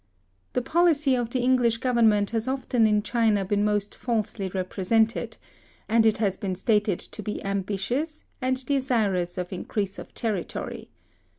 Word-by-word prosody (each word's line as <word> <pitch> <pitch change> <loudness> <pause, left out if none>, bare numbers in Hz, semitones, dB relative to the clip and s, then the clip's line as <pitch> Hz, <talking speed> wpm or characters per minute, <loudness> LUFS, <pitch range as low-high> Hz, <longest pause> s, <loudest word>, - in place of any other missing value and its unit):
The 250 - 0
policy 310 -3 +3
of 240 -2 0
the 255 +1 -1
English 245 -2 +3
government 230 -5 +3
has 225 +1 -1
often 255 -3 +2
in 210 -1 +2
China 220 -3 +2
been 205 +2 +1
most 210 -1 0
falsely 215 -4 -2
represented, 195 +4 0 0.5
and 225 0 +4
it 220 - +3
has 200 -3 0
been 190 -2 -3
stated 210 -1 +1
to - - -8
be 210 - -4
ambitious, 200 - -2 0.2
and 260 0 -1
desirous 220 -11 0
of 180 +1 -4
increase 195 +1 -3
of - - -10
territory. 210 -6 -4
220 Hz, 150 wpm, -26 LUFS, 200-250 Hz, 0.5 s, and